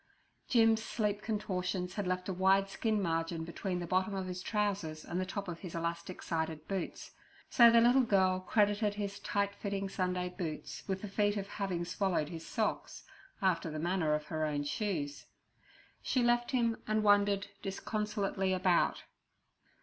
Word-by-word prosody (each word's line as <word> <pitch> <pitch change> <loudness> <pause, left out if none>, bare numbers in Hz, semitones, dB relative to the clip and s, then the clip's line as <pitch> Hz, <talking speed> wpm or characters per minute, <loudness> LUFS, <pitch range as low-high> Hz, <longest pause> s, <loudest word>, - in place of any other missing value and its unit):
Jim's 225 -2 +4
sleep 210 -2 -1
contortions 185 -4 -2
had 205 -3 -2
left 185 0 -1
a 190 - -1
wide 190 +2 +3
skin 215 +2 0
margin 165 -2 -1
between 180 +2 -3
the 175 - -3
bottom 185 +3 0
of 190 -1 -2
his 180 0 -5
trousers 195 -8 -1
and 180 - -2
the 185 - -3
top 200 +1 -4
of 170 -1 -5
his 180 -4 -7
elastic 170 +2 -4
sided 160 -2 -2
boots, 195 -3 -4 0.4
so 235 -1 +8
the 230 0 +6
little 245 +3 +6
girl 190 -5 +3
credited 205 +2 +2
his 200 -1 -4
tightly 200 0 -1
fitting 200 -1 -2
Sunday 180 -1 -1
boots 175 -4 -5
with 190 0 -2
the - - -3
feat 205 +1 +1
of 195 -1 -3
having 185 -4 -2
swallowed 175 -4 0
his 165 -2 -7
socks, 220 - -2 0.4
after 170 -3 +2
the 155 - -5
manner 165 -1 +1
of 150 0 -4
her 155 0 -2
own 145 -2 0
shoes. 145 -2 -3 0.7
She 255 - +1
left 240 0 +2
him 235 -3 +1
and 215 0 +1
wandered 205 -1 +3
disconsolately 200 -1 -1
about. 185 -2 +2
190 Hz, 165 wpm, -33 LUFS, 175-205 Hz, 0.7 s, so